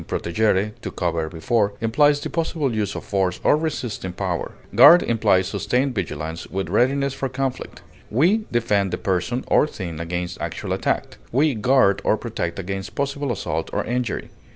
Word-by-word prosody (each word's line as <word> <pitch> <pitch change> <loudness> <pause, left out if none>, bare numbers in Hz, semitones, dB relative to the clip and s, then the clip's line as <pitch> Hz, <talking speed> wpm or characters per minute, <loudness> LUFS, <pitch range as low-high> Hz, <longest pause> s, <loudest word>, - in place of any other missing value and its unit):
protegere, 105 +3 +1
to - - -4
cover 85 -3 -2
before) 100 +5 0
implies 145 +6 +3
the - - -3
possible 160 -5 -1
use 105 -2 -1
of - - -5
force 95 -3 -1
or - - +5
resisting 130 - -3
power; 90 -1 -3 0.2
guard 175 +1 +8
implies 105 -5 +2
sustained 130 +2 0
vigilance 80 -5 -4
with 95 0 -3
readiness 140 +2 +2
for 135 - -3
conflict; 130 0 -4 0.3
we 180 - +2
defend 105 -5 +1
a - - -7
person 95 +6 -1
or - - +3
thing 85 - -6
against 90 +1 -4
actual - - -3
attack; - - -2
we 145 +4 +3
guard 110 -3 +3
or 110 - +2
protect 105 -8 -4
against 95 0 -5
possible 140 -1 -2
assault 80 -7 -3
or - - 0
injury. 120 -2 -2
110 Hz, 160 wpm, -22 LUFS, 95-135 Hz, 0.3 s, guard